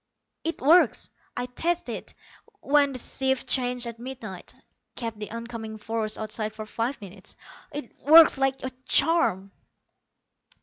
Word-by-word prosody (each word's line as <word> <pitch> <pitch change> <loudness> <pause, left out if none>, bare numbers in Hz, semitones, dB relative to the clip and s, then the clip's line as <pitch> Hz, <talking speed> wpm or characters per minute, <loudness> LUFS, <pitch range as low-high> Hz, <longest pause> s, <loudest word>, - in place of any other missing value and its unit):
"It 330 - -3
works. 330 +6 +4 0.3
I 245 - -1
tested 335 +8 -2
it - - -10 0.5
when 285 0 +3
the - - -3
shifts 265 +1 0
changed 250 -1 +1
at 235 -1 -7
midnight; 235 -7 -8 0.4
kept 230 -3 -5
the 210 - -6
oncoming 230 -1 -7
force 220 0 -3
outside 215 0 -3
for 215 0 -6
five 230 +5 -3
minutes. 195 -1 -11 0.4
It 290 -5 -7
works 315 -1 +7
like 270 0 0
a 260 - -3 0.2
charm." 275 - +3
245 Hz, 135 wpm, -26 LUFS, 220-270 Hz, 0.5 s, works